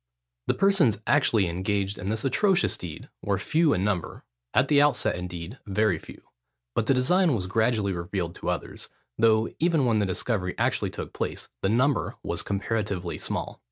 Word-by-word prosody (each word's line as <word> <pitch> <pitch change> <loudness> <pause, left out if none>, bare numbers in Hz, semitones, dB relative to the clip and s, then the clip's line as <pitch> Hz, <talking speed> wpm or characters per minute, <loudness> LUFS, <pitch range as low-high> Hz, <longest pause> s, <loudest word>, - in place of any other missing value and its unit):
The - - +2
persons 190 - +3
actually 115 -9 +3
engaged 95 +3 -1
in 95 - -4
this 110 +3 -2
atrocious 190 +6 +3
deed 85 -2 -8
were 100 -1 0
few 155 - +2
in 95 - +1
number: 100 -4 -2 0.3
at 130 - +3
the 145 -1 +5
outset, 145 -3 +2
indeed, 90 +5 -6
very 100 -3 +1
few: - - -13 0.5
but 110 - 0
the 135 - +4
design 165 +4 +3
was 95 -5 -2
gradually 110 0 +1
revealed 85 0 -3
to - - -3
others, - - -4 0.3
though 110 0 +4
even 160 -4 +2
when 115 -3 +2
the 100 - +1
discovery 95 0 -1
actually - - +1
took - - -7
place, - - -4
the 95 - +1
number 130 +4 +1
was - - -2
comparatively 100 -3 -2
small. - - -4
110 Hz, 170 wpm, -26 LUFS, 95-135 Hz, 0.5 s, the